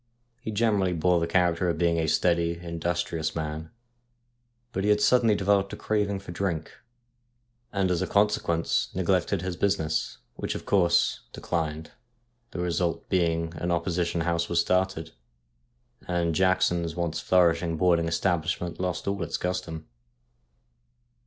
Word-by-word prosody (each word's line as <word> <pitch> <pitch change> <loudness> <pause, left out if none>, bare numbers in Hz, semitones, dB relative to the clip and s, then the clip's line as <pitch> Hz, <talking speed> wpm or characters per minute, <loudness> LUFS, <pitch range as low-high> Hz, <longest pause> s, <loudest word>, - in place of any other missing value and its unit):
He - - -5
generally 105 -4 +1
bore 90 +1 +2
the 85 - -1
character 90 0 +2
of 85 - -1
being 85 0 +2
a 80 - 0
steady, 85 +1 +1
industrious 85 -1 -2
man, 80 0 -4 1.0
but 95 - -2
he 105 0 +4
suddenly 115 +1 +4
developed 100 0 +1
a - - -3
craving 105 -2 -1
for 95 - -9
drink, 85 -3 -2 1.0
and 95 -2 0
as 85 - 0
a - - -1
consequence 100 -5 +1
neglected 95 0 +1
his 90 -1 -3
business, 85 -5 0 0.2
which, - - -4
of - - -6
course, 90 -4 +3
declined, 80 -2 -3 0.6
the - - -9
result 85 -1 -1
being 85 -3 +1
an 85 - -2
opposition 85 0 0
house 85 0 0
was 85 - +2
started, 90 -2 0 1.0
and 85 -2 0
Jackson's 85 -2 +1
once 85 -2 -2
flourishing 85 -2 +2
boarding 85 -1 +3
establishment 85 0 -1
lost 90 0 -3
all 100 0 -1
its 85 -1 -2
custom. 80 -3 -4
85 Hz, 135 wpm, -27 LUFS, 85-95 Hz, 1.0 s, he